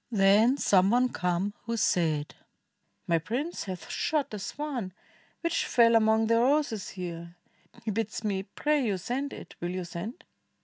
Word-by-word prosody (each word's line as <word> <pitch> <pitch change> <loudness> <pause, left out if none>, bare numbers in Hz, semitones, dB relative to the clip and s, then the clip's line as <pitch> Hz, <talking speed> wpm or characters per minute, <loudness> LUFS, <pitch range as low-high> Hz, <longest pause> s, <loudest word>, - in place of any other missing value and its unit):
Then 215 +4 +4
some 190 -7 +4
one 250 +3 +3
came 180 +3 -1
who 230 +1 -2
said, 155 -7 +1 0.7
"My 165 -1 +2
prince 255 - -3
hath 185 -2 -6
shot 295 -6 -1
A 210 - -4
swan, 250 -5 -4 0.5
which 335 -1 0
fell 235 -1 +5
among 220 0 +4
the 230 +1 +3
roses 255 -5 +1
here, 170 -2 -7 0.5
He 220 - 0
bids 220 +1 -3
me 200 -3 0
pray 290 +9 0
you 205 -5 0
send 265 +9 -3
it. - - -10
Will 175 - -2
you 185 0 -3
send?" 215 - -7
215 Hz, 160 wpm, -28 LUFS, 185-250 Hz, 0.7 s, fell